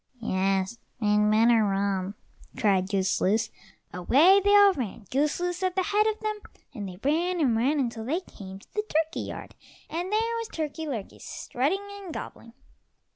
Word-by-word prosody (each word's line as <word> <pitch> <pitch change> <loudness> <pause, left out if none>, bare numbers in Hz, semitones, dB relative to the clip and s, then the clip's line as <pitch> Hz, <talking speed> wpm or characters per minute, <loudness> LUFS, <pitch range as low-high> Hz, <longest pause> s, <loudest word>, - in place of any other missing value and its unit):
"Yes, 195 0 0 0.2
we'd 210 -1 +3
better 225 +1 +5
run," 195 -1 -1 0.4
cried 190 -3 +2
Goose 190 -2 0
loose. 215 +4 +1 0.4
Away 295 - +5
they 405 0 +5
all 405 -1 +7
ran, 230 - -5
Goose 290 +5 +1
loose 355 +1 -2
at 370 -1 0
the 375 - +2
head 420 +3 +2
of 435 0 -1
them, 430 -1 -2 0.3
and 205 -6 -5
they 180 - -10
ran 340 +6 +1
and 260 -7 +2
ran 270 +7 +2
until 235 -4 -2
they 320 +9 -1
came 190 - -10
to 195 - -20
the 425 - 0
turkey 320 +1 0
yard, - - -7 0.4
and 350 +4 -3
there 455 +2 +1
was 460 - -4
Turkey 315 0 -4
lurkey 230 -9 -6
strutting 345 +11 -2
and 375 -4 -8
gobbling. 230 -5 -8
265 Hz, 175 wpm, -27 LUFS, -, 0.4 s, all